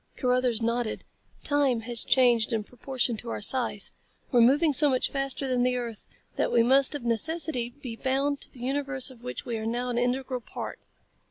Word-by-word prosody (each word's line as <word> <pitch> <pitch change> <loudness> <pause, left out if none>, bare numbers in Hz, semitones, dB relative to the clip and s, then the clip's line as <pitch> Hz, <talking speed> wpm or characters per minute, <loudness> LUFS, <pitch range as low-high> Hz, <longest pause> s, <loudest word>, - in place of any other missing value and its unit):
Carruthers 250 -3 +1
nodded. 235 0 -1 0.4
"Time 280 -5 +2
has 235 0 -5
changed 240 -3 +4
in 220 -2 0
proportion 250 0 -2
to 235 - -7
our - - -3
size. 215 -3 -1 0.4
We're 245 -3 +5
moving 285 +6 +5
so 290 +1 +4
much 255 -2 +1
faster 275 0 -1
than 250 -1 +1
the 250 0 +2
earth 235 -3 -6 0.3
that - - +1
we 235 - +5
must 270 +4 +4
of 285 - -5
necessity 250 +1 0
be 240 -3 -5
bound 275 +3 0
to - - -3
the 245 - -12
universe 275 0 -1
of 240 -3 -16
which 250 0 -6
we 235 -3 -2
are 220 - -5
now 245 +2 -1
an 240 -1 0
integral 250 +1 -1
part." - - -6
250 Hz, 190 wpm, -27 LUFS, 235-270 Hz, 0.4 s, We're